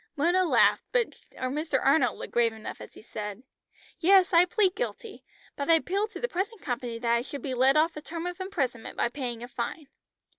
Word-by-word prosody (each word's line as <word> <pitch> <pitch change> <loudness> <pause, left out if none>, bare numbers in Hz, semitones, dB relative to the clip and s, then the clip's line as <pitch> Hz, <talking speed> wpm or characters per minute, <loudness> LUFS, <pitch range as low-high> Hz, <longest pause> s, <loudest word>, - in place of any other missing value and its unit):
Mona 345 +5 +3
laughed, - - +4
but 485 -2 +2 0.2
Mr. 270 +2 -1
Arnold 280 +5 +3
looked - - -8
grave 235 -1 +3
enough 220 0 -8
as - - -11
he - - -13
said: 210 0 -6 0.6
"Yes, 375 +1 +5
I 340 +1 +7
plead 395 -2 +2
guilty, 460 -3 -5 0.3
but 280 +1 -4
I 330 - +8
appeal 390 +6 0
to - - -9
the 485 - -1
present 405 +3 -3
company 245 -5 -4
that 235 0 0
I 235 - +2
should 280 +2 -7
be 265 - -3
let 260 +3 +4
off 320 +2 +3
a 300 - -6
term 335 +2 -6
of 355 +1 -5
imprisonment 275 - -3
by - - +1
paying 240 -3 -5
a - - -6
fine." 255 +5 -5
300 Hz, 210 wpm, -28 LUFS, 245-360 Hz, 0.6 s, I